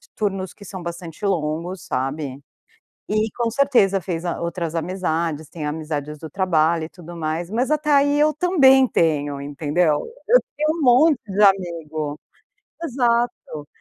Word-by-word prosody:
turnos 195 -3 -2
que 210 - -15
são 190 -1 -8
bastante 170 +2 -7
longos, 170 0 -2
sabe. 135 +1 -3 0.7
E 215 +1 +1
com 235 -1 +1
certeza 235 -8 +3
fez 170 -1 -4
a 170 - -3
outras 170 -1 -3
amizades, 165 -3 -2
tem 160 -1 -7
amizades 150 -1 -4
do 160 +1 -9
trabalho 165 -3 +1
e - - -10
tudo 175 -1 -11
mais, 165 +1 -3
mas 245 +5 0
até 300 0 +1
aí 285 +1 +4
eu 305 +1 +4
também 275 -6 +5
tenho, 145 - 0
entendeu? 150 +3 0 0.3
Eu - - +7 0.2
tenho 305 +1 +1
um - - -3
monte 280 +3 +5
de 200 +1 -1
amigo, 165 -6 +1 0.6
exato, 240 - -1
175 Hz, 150 wpm, -22 LUFS, 155-235 Hz, 0.7 s, Eu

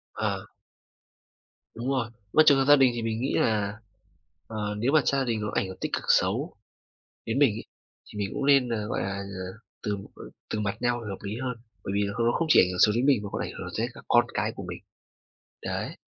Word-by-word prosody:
À. - - -2 1.3
Đúng 120 +4 -3
rồi. 130 -4 0 0.2
Mà 155 - +7
trường 140 - +7
hợp 135 - +2
gia 145 - +8
đình 135 -3 +5
thì 120 - -2
mình 115 +1 -2
nghĩ 135 - -1
là, 105 -1 +1 0.7
ờ, 105 -2 -3
nếu 120 +6 +1
mà 155 0 +5
gia 135 -1 +2
đình 115 -4 -1
nó 105 - -2
ảnh - - +1
hưởng 95 0 -8
tích - - -3
cực - - -1
xấu - - +2 0.7
đến 115 +3 -1
mình 140 -4 +6
ấy, - - -6 0.4
thì 105 - -10
mình 100 -1 -1
cũng 140 -1 -1
nên 135 -3 +5
là, 105 -3 -2
gọi - - -2
là, 100 0 -2
ờ, 100 0 -6 0.2
từ 105 -2 -2 0.5
từ 110 - -1
mặt 105 0 -1
nhau 120 0 +1
là 105 - -6
hợp 95 - -5
lý 100 +1 -4
hơn. 125 -2 -2 0.3
Bởi - - -3
vì 100 - +2
nó 100 - -3
không 115 - +1
không 165 - +1
chỉ - - +8
ảnh 90 - +4
hưởng 90 - -4
xấu 105 - +6
đến 125 +4 +1
mình 135 -6 +4
mà 100 - -5
có - - -2
ảnh - - -5
hưởng - - -5
tới 115 - +1
các - - -13
con 120 0 +5
cái 105 +1 0
của 100 - -6
mình. 85 - -5 0.8
Đấy. - - -3
110 Hz, 240 wpm, -27 LUFS, 105-130 Hz, 1.3 s, gia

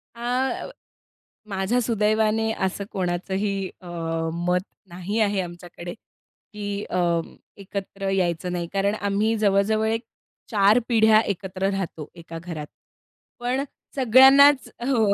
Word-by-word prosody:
आ, 250 - -1 0.8
माझ्या 195 +5 0
सुदैवाने 220 0 +1
असं 195 +2 -3
कोणाचंही 190 +2 -2
अ, 180 - -12 0.5
मत 180 +2 0 0.3
नाही 185 +5 -3
आहे 205 -3 +2
आमच्याकडे 175 0 -8
की 205 -2 -9
अ, 180 - 0 0.6
एकत्र 195 0 -5
यायचं 180 -2 0
नाही, 175 -1 -3
कारण 200 +2 +1
आम्ही 205 +3 +1
जवळ-जवळ 210 +1 +2
एक 225 +1 0 0.5
4 210 +2 +5
पिढ्या 220 -2 +6
एकत्र 195 -1 -2
राहतो 170 -6 -4
एका 165 -1 -9
घरात. 155 -4 -6 0.7
पण 250 +3 -1 0.3
सगळ्यांनाच 270 +2 +7 0.2
हो 230 -6 +3
200 Hz, 110 wpm, -24 LUFS, 185-220 Hz, 0.8 s, सगळ्यांनाच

